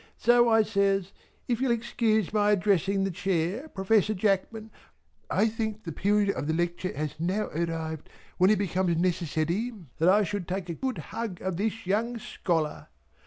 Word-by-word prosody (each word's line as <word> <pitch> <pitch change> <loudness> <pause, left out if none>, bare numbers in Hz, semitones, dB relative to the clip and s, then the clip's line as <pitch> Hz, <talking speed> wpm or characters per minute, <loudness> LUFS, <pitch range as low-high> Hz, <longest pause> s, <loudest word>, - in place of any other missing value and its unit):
So 240 0 +4
I 225 -1 +5
says 195 -3 +1 0.4
"if 240 -1 0
you'll 265 - +2
excuse 225 -3 +1
my 210 -1 +3
addressing 195 0 +2
the 195 - -1
chair 185 - -1
Professor 210 +1 +2
Jackman 215 +3 -1 0.6
I 220 - +3
think 220 -1 -3
the 165 - -5
period 200 +5 +2
of 145 - -4
the 160 - 0
lecture 175 +2 -1
has 150 -1 -2
now 185 +6 -1
arrived 160 -1 -3 0.3
when 185 +2 +6
it 215 - +4
becomes 185 -3 0
necessary 175 +4 0 0.3
that 165 +3 +4
I 205 +3 +5
should 200 -2 -3
take 185 -1 -3
a - - -1
good 260 +8 -3 0.2
hug 220 -6 -4
of 185 -2 -2
this 220 +2 -2
young 225 +6 0
scholar." 165 -7 -2
195 Hz, 165 wpm, -27 LUFS, 175-220 Hz, 0.6 s, when